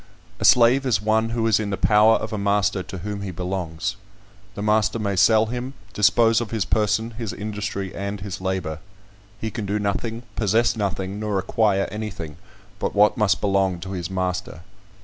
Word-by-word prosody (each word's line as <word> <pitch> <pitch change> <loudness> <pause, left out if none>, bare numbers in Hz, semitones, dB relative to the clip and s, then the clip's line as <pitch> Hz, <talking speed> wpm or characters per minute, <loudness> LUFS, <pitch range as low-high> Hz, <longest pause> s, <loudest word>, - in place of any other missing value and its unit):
A - - -1
slave 125 +3 +6
is 110 -7 +2
one 110 +2 +1
who 115 -1 -1
is 110 -2 +3
in 105 -2 -2
the 100 - -2
power 110 +1 +5
of 110 0 -3
a - - -1
master 100 -1 +1
to 95 +1 -8
whom 100 +2 -5
he 100 - -4
belongs. 90 -1 -3 0.6
The 100 - -4
master 110 +1 +2
may 100 -3 -1
sell 110 +4 +5
him, 125 +4 -5 0.2
dispose 115 +3 +4
of 115 - -4
his 110 -4 -1
person, 110 +2 +1
his 115 -2 -5
industry, 105 -2 -4
and 100 +1 -4
his 95 -1 -6
labour. 95 -4 -2 0.6
He 110 0 -3
can 110 -4 -4
do 100 +2 0
nothing, 110 +3 -2
possess 115 +3 +2
nothing, 100 -2 -3
nor 105 -2 -1
acquire 100 +1 +1
anything, 95 -8 -6 0.4
but - - -2
what 105 +1 +5
must 100 -5 +2
belong 95 -3 +1
to 95 +2 -6
his 90 -2 -4
master. 90 -3 -3
105 Hz, 185 wpm, -23 LUFS, 95-110 Hz, 0.6 s, slave